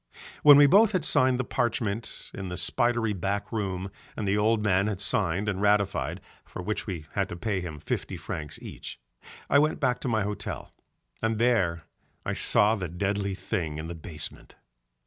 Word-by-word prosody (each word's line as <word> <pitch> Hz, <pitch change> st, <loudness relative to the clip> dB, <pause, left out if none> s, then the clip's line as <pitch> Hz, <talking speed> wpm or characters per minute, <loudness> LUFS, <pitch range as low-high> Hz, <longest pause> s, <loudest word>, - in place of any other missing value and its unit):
When 145 Hz, -1 st, +9 dB
we 145 Hz, -, +8 dB
both 205 Hz, +8 st, +5 dB
had 180 Hz, -5 st, 0 dB
signed 130 Hz, -3 st, +3 dB
the -, -, +1 dB
parchment 115 Hz, -3 st, -2 dB
in 95 Hz, -1 st, -5 dB
the 90 Hz, -, -5 dB
spidery 115 Hz, +4 st, +2 dB
back 100 Hz, +2 st, -2 dB
room 95 Hz, -4 st, -3 dB, 0.3 s
and 105 Hz, -, -2 dB
the 100 Hz, -, +2 dB
old 105 Hz, +1 st, +2 dB
man 100 Hz, -1 st, +2 dB
had 105 Hz, -4 st, -2 dB
signed 100 Hz, -1 st, 0 dB
and 100 Hz, -1 st, -1 dB
ratified 105 Hz, -1 st, +1 dB, 0.2 s
(for -, -, -10 dB
which 105 Hz, +4 st, -3 dB
we 85 Hz, -6 st, -5 dB
had -, -, -1 dB
to -, -, -5 dB
pay 100 Hz, +1 st, -2 dB
him 85 Hz, -4 st, -6 dB
fifty -, -, -4 dB
francs 75 Hz, -2 st, -5 dB
each) -, -, -8 dB, 0.5 s
I 140 Hz, -, +5 dB
went 155 Hz, +1 st, +1 dB
back 125 Hz, -3 st, +1 dB
to -, -, -4 dB
my 110 Hz, -3 st, +1 dB
hotel, 105 Hz, +1 st, -5 dB, 0.5 s
and 115 Hz, 0 st, 0 dB
there 100 Hz, -9 st, +2 dB, 0.4 s
I -, -, -1 dB
saw 105 Hz, +2 st, +4 dB
the 95 Hz, -5 st, -2 dB
deadly 100 Hz, +2 st, -1 dB
thing 85 Hz, -7 st, -3 dB
in 80 Hz, +1 st, -5 dB
the -, -, -4 dB
basement. 80 Hz, -1 st, -5 dB
105 Hz, 185 wpm, -27 LUFS, 95-115 Hz, 0.5 s, When